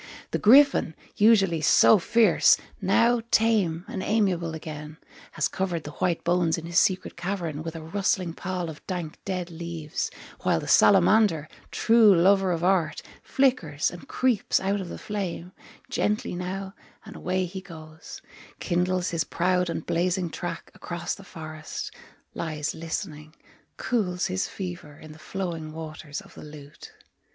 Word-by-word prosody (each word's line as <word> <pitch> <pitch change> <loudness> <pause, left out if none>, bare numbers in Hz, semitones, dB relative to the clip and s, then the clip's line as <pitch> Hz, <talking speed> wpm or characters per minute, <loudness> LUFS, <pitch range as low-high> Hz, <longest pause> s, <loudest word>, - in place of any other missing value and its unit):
The - - -1
griffin, 265 - +5 0.2
usually 200 -7 +4
so 210 +6 +6
fierce, 215 -1 +4 0.2
Now 230 +5 +3
tame 200 -8 +2
and 190 - -5
amiable 185 -7 0
again, 150 -1 -8 0.4
Has 155 - +1
covered 175 -4 -3
the 150 - -7
white 175 +1 -1
bones 175 -2 +2
in 165 - -7
his 170 +1 +3
secret 185 -1 0
cavern 170 -4 -3
With 165 +1 -6
a 160 - -7
rustling 185 0 -1
pall 180 -1 -4
of 150 - -14
dank 175 -4 -5
dead 180 -2 -3
leaves, 165 -2 -4 0.3
While - - +1
the - - -7
salamander, 195 -4 +5 0.2
true 225 -3 +5
lover 190 +2 +4
of 170 -1 -2
art, 180 -4 +1 0.2
Flickers, 245 - +1
and 175 - -11
creeps 255 -5 +1
out 195 +1 -1
of 180 - -7
the - - -6
flame; 185 -4 -5 0.4
Gently 210 -2 -1
now, 190 +2 -5 0.3
and - - -11
away 185 +1 -1
he 185 +2 -7
goes, 160 -3 -11 0.4
Kindles 180 0 0
his 165 -2 0
proud 180 +2 0
and 165 -1 -4
blazing 175 0 0
track 175 0 -6
Across 175 -1 -4
the 195 - -10
forest, 155 -3 -7 0.4
Lies 155 -3 -3
listening, 160 -1 -6 0.4
Cools 190 -7 -1
his 185 +1 -1
fever 175 -6 -7
in 155 - -12
the 155 - -14
flowing 170 -4 -5
waters 155 -2 -7
of - - -17
the - - -12
lute. 150 -1 -12
175 Hz, 150 wpm, -26 LUFS, 160-195 Hz, 0.4 s, so